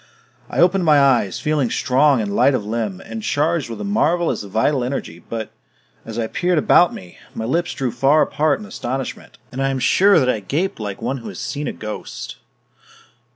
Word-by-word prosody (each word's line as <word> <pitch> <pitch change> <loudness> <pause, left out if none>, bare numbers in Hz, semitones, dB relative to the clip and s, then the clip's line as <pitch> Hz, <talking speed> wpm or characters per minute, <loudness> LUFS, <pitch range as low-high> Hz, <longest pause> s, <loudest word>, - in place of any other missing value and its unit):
I - - -6
opened 180 +2 +4
my 150 -3 +5
eyes, 125 -9 +2
feeling 150 -5 0
strong 130 +1 +2
and 100 -1 -3
light 130 +3 +4
of 105 - -3
limb 110 -3 -3
and 110 0 -6
charged 150 +3 0
with 115 - -6
a - - -4
marvelous 175 -5 +1
vital 110 +7 0
energy 120 -10 -4
but, 115 -2 -4 0.6
as 115 0 -6
I 115 - 0
peered 175 +9 0
about 175 +3 +5
me, 90 -1 -11 0.2
my 110 - -3
lips 165 +8 -1
drew 130 -3 -2
far 135 +6 +3
apart 150 +1 0
in 210 - -9
astonishment, 130 -8 -5
and 130 - -4
I 135 - +1
am 135 - -1
sure 195 +10 +4
that 130 -5 +3
I 125 - +1
gaped 150 - -2
like 105 -2 -5
one 135 - -1
who 115 - -9
has - - -9
seen 150 0 -4
a - - -1
ghost. 105 - -7
135 Hz, 200 wpm, -20 LUFS, 110-155 Hz, 0.6 s, my